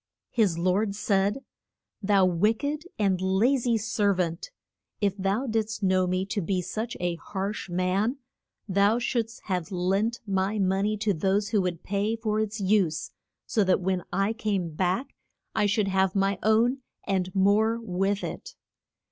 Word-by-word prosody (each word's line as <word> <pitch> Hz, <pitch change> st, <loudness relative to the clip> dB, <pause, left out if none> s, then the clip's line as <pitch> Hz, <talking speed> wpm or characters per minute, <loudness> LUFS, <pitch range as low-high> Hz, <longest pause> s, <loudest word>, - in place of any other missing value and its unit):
His 205 Hz, -8 st, +2 dB
lord 195 Hz, +4 st, +1 dB
said, 200 Hz, +5 st, +1 dB, 0.6 s
Thou 195 Hz, -2 st, +4 dB
wick 210 Hz, -, +1 dB
ed 300 Hz, +3 st, -2 dB
and 195 Hz, -4 st, +1 dB
la 190 Hz, +8 st, +3 dB
zy 240 Hz, -3 st, +1 dB
ser 210 Hz, -2 st, +1 dB
vant, 170 Hz, -, -2 dB, 0.5 s
if 200 Hz, -2 st, +1 dB
thou 200 Hz, +6 st, 0 dB
didst 220 Hz, -3 st, -2 dB
know 185 Hz, -1 st, +3 dB
me 185 Hz, +1 st, 0 dB
to 200 Hz, +1 st, -2 dB
be 185 Hz, +2 st, 0 dB
such 220 Hz, +6 st, -4 dB
a 175 Hz, -1 st, -1 dB
harsh 195 Hz, +2 st, -4 dB
man 185 Hz, +8 st, 0 dB, 0.5 s
thou 200 Hz, +3 st, +3 dB
shouldst 235 Hz, -2 st, -2 dB
have 180 Hz, -5 st, -2 dB
lent 195 Hz, +6 st, 0 dB
my 195 Hz, +1 st, 0 dB
mo 190 Hz, -1 st, +1 dB
ney 215 Hz, +1 st, 0 dB
to 205 Hz, -1 st, +1 dB
those 195 Hz, +5 st, 0 dB
who 210 Hz, -3 st, +2 dB
would 180 Hz, -3 st, -3 dB
pay 205 Hz, +3 st, 0 dB
for 215 Hz, -1 st, -1 dB
its 215 Hz, 0 st, -2 dB
use, 190 Hz, -5 st, +1 dB, 0.3 s
so 215 Hz, -, +1 dB
that 185 Hz, -1 st, +3 dB
when 185 Hz, -1 st, 0 dB
I 195 Hz, +3 st, +1 dB
came 200 Hz, -7 st, -2 dB
back 185 Hz, -, -1 dB, 0.4 s
I 210 Hz, -1 st, +2 dB
should 200 Hz, 0 st, +1 dB
have 190 Hz, -1 st, +1 dB
my 195 Hz, -1 st, +1 dB
own 230 Hz, +5 st, +3 dB, 0.2 s
and 190 Hz, -2 st, 0 dB
more 210 Hz, +4 st, +3 dB
with 195 Hz, -1 st, -1 dB
it. -, -, -6 dB
200 Hz, 165 wpm, -27 LUFS, 185-220 Hz, 0.6 s, Thou